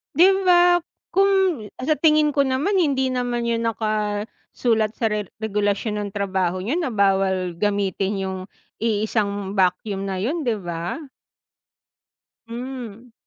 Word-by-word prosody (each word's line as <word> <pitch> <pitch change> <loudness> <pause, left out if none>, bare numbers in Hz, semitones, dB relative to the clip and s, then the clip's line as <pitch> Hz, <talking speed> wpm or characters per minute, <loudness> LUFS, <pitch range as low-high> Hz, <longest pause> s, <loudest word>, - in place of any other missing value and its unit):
'Di 350 +4 +7 0.2
ba 350 0 +6 0.4
kung 385 - +3 0.2
sa 305 +4 +2
tingin 305 -1 +4
ko 280 - +3
naman 285 +10 +1
hindi 270 -6 +2
naman 245 -2 -1
'yun 230 0 0
nakasulat 215 +1 -1
sa 225 -2 0
re 210 -1 -2 0.2
regulasyon 210 0 0
ng 205 - -4
trabaho 190 -3 -1
niyo 250 - -1
na 330 -7 -1
bawal 190 -3 +2
gamitin 200 -1 0
'yung 190 0 -3 0.4
iisang 205 -3 -1
vacuum 195 +2 +1
na 190 -1 -3
'yun, 310 +9 -1
'di 225 -3 +1
ba? 175 - -4 1.4
Hmm. 240 -1 -7
220 Hz, 125 wpm, -22 LUFS, 200-265 Hz, 1.4 s, Di